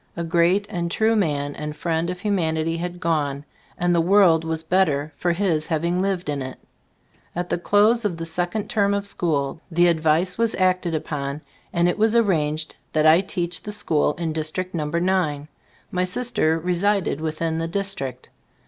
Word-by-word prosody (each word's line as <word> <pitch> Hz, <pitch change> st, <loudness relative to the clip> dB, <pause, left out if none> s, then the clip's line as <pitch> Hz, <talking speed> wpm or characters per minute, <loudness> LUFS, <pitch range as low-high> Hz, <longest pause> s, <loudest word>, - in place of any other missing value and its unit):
A 170 Hz, -, -2 dB
great 170 Hz, +4 st, +2 dB
and 170 Hz, -2 st, -3 dB
true 220 Hz, +5 st, +2 dB
man 145 Hz, -8 st, 0 dB
and 150 Hz, 0 st, -5 dB
friend 165 Hz, +1 st, -1 dB
of 180 Hz, 0 st, -5 dB
humanity 165 Hz, -5 st, 0 dB
had 175 Hz, +1 st, -5 dB
gone, 145 Hz, -4 st, -1 dB, 0.3 s
and 175 Hz, 0 st, +1 dB
the 170 Hz, -, +3 dB
world 175 Hz, -3 st, +5 dB
was 160 Hz, 0 st, -3 dB
better 155 Hz, -4 st, +1 dB
for 175 Hz, -, 0 dB
his 170 Hz, -4 st, 0 dB
having 170 Hz, +2 st, 0 dB
lived 190 Hz, -3 st, -1 dB
in 145 Hz, -2 st, -2 dB
it. 130 Hz, 0 st, -6 dB, 0.8 s
At 175 Hz, +1 st, -3 dB
the -, -, 0 dB
<Iose 210 Hz, +6 st, +3 dB
of 190 Hz, -6 st, -1 dB
the 165 Hz, -, -4 dB
second 175 Hz, +5 st, -2 dB
term 200 Hz, -2 st, +1 dB
of 200 Hz, 0 st, -2 dB
school, 155 Hz, -6 st, -1 dB
the 175 Hz, 0 st, +3 dB
advice 165 Hz, +3 st, +2 dB
was 230 Hz, -1 st, +1 dB
acted 185 Hz, -2 st, +1 dB
upon, 145 Hz, -1 st, -4 dB, 0.3 s
and 170 Hz, 0 st, +2 dB
it 175 Hz, -, -1 dB
was 220 Hz, +1 st, +3 dB
arranged 155 Hz, -8 st, +1 dB, 0.2 s
that 155 Hz, 0 st, +2 dB
I 160 Hz, +3 st, +7 dB
teach 175 Hz, -3 st, -3 dB
the 210 Hz, -, -6 dB
school 160 Hz, -8 st, +1 dB
in 165 Hz, -1 st, -3 dB
District 160 Hz, +4 st, -3 dB
No. 155 Hz, -3 st, -2 dB
9. 170 Hz, -4 st, 0 dB, 0.4 s
My 180 Hz, 0 st, 0 dB
sister 185 Hz, -4 st, +1 dB
resided 180 Hz, 0 st, 0 dB
within 160 Hz, +1 st, -2 dB
the 165 Hz, -, -2 dB
district. 165 Hz, -, -4 dB
170 Hz, 175 wpm, -23 LUFS, 155-190 Hz, 0.8 s, I